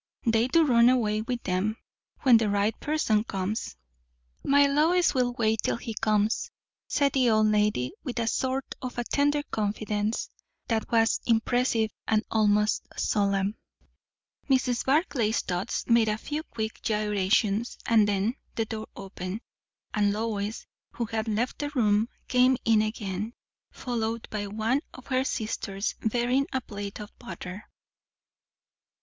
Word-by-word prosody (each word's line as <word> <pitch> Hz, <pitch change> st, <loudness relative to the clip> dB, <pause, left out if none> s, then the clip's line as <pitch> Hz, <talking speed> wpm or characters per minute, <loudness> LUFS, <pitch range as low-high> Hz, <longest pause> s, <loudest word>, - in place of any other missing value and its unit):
They 225 Hz, +1 st, +3 dB
do 325 Hz, +5 st, +4 dB
run 240 Hz, -3 st, +6 dB
away 215 Hz, -4 st, +2 dB
with 240 Hz, +2 st, -4 dB
them, 195 Hz, +4 st, -1 dB, 0.5 s
when 250 Hz, -5 st, +7 dB
the 220 Hz, -2 st, +1 dB
right 205 Hz, +2 st, +1 dB
person 265 Hz, -9 st, +1 dB
comes." 195 Hz, -, -3 dB, 0.7 s
"My 285 Hz, +1 st, +5 dB
Lois 320 Hz, +5 st, +3 dB
will 250 Hz, -2 st, +1 dB
wait 220 Hz, -2 st, +1 dB
till -, -, 0 dB
he 230 Hz, -1 st, -6 dB
comes," 215 Hz, +1 st, +1 dB, 0.4 s
said 280 Hz, -1 st, +1 dB
the 255 Hz, -3 st, +3 dB
old 215 Hz, -1 st, +4 dB
lady, 210 Hz, -12 st, +1 dB
with 250 Hz, -3 st, -5 dB
a 230 Hz, -, +1 dB
sort 260 Hz, +3 st, -1 dB, 0.2 s
of 250 Hz, -2 st, -5 dB
tender 290 Hz, +1 st, +2 dB
confidence 210 Hz, 0 st, -1 dB, 0.4 s
that 225 Hz, -2 st, -1 dB
was 225 Hz, -1 st, +3 dB
impressive 230 Hz, -1 st, +2 dB, 0.2 s
and 215 Hz, 0 st, +2 dB
almost 210 Hz, -1 st, +2 dB
solemn. 200 Hz, 0 st, +1 dB, 0.9 s
Mrs. 255 Hz, -3 st, +2 dB
Barclay's 265 Hz, -, +2 dB
thoughts 180 Hz, +1 st, -3 dB
made 230 Hz, -2 st, +4 dB
a 210 Hz, -, 0 dB
few 295 Hz, +7 st, -4 dB
quick 220 Hz, -8 st, -5 dB
gyrations; 210 Hz, +1 st, +1 dB
and 220 Hz, -3 st, +4 dB
then 205 Hz, +3 st, +1 dB, 0.2 s
the 225 Hz, -, 0 dB
door 220 Hz, 0 st, -5 dB
opened, 195 Hz, +1 st, -6 dB, 0.5 s
and 205 Hz, -1 st, +2 dB
Lois, 210 Hz, 0 st, -3 dB, 0.3 s
who 235 Hz, -, -2 dB
had 220 Hz, 0 st, -3 dB
left 220 Hz, +3 st, -1 dB
the 290 Hz, -, -2 dB
room, 215 Hz, -2 st, +3 dB, 0.2 s
came 255 Hz, 0 st, +4 dB
in 225 Hz, -1 st, +5 dB
again, 215 Hz, 0 st, -3 dB, 0.4 s
followed 230 Hz, -2 st, -3 dB
by 205 Hz, -1 st, -3 dB
one 220 Hz, +7 st, 0 dB
of 255 Hz, -, -12 dB
her 260 Hz, -1 st, +1 dB
sisters 215 Hz, -5 st, -2 dB
bearing 245 Hz, +5 st, +1 dB
a 260 Hz, -, 0 dB
plate 205 Hz, -4 st, -7 dB
of 210 Hz, -1 st, -9 dB
butter. 185 Hz, +2 st, -8 dB
220 Hz, 140 wpm, -27 LUFS, 210-245 Hz, 0.9 s, when